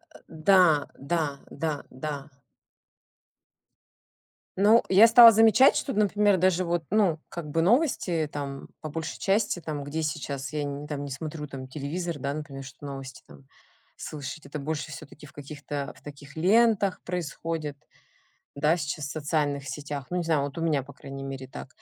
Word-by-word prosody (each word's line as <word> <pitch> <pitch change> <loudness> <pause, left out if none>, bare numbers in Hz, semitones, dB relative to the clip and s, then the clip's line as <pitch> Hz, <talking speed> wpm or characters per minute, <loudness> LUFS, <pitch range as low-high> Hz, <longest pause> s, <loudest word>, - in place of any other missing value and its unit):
Э, - - -13 0.3
да, 190 -2 +8 0.5
да, 170 -2 +2 0.4
да, 160 -2 +1 0.3
да. 150 -1 -1 2.4
Ну, 210 +4 +5
я 200 +4 +8
стала 230 0 +10
замечать, 225 +5 +6
что, 270 - -2
например, 205 -1 +3
даже 185 0 +2
вот, 170 -1 -1
ну, 190 -6 +2
как 170 -5 -6
бы 165 +3 +1
новости, 180 - +2
там, 140 -1 -5
по 155 - -5
большей 160 +1 -5
части 200 -2 +1
там, 150 -3 -4
где 155 +3 -3
сейчас 140 -2 -4
я 150 -1 -2
нь 145 +1 -5
там 145 -1 -4
не 140 - -7
смотрю 150 +2 -5
там 135 -2 -8
телевизор, 155 +4 -4
да, 140 +2 -2
например, 140 -2 -7
чтобы 140 +2 -9
новости 135 -1 -8
там 70 -2 -16 0.5
слышать. 150 +1 -7
Это 145 +2 -6
больше 155 +1 -4
все-таки 150 0 -11
в 145 - -14
каких-то 145 -1 -6
в - - -19
таких 145 -1 -11
лентах 200 +3 +3
происходит, 165 -3 -4 0.8
да, 150 +4 +2
сейчас, 150 -1 -3
в - - -6
социальных 145 -3 -1
сетях. 140 0 -5
Ну, 180 - -2
не 180 - +1
знаю, 160 -3 +2
вот 140 +1 -5
у 165 - -3
меня, 150 -4 +1
по 140 +1 -13
крайней 135 0 -8
мере, 135 -1 -6
так. 130 - -9
155 Hz, 170 wpm, -27 LUFS, 140-180 Hz, 2.4 s, стала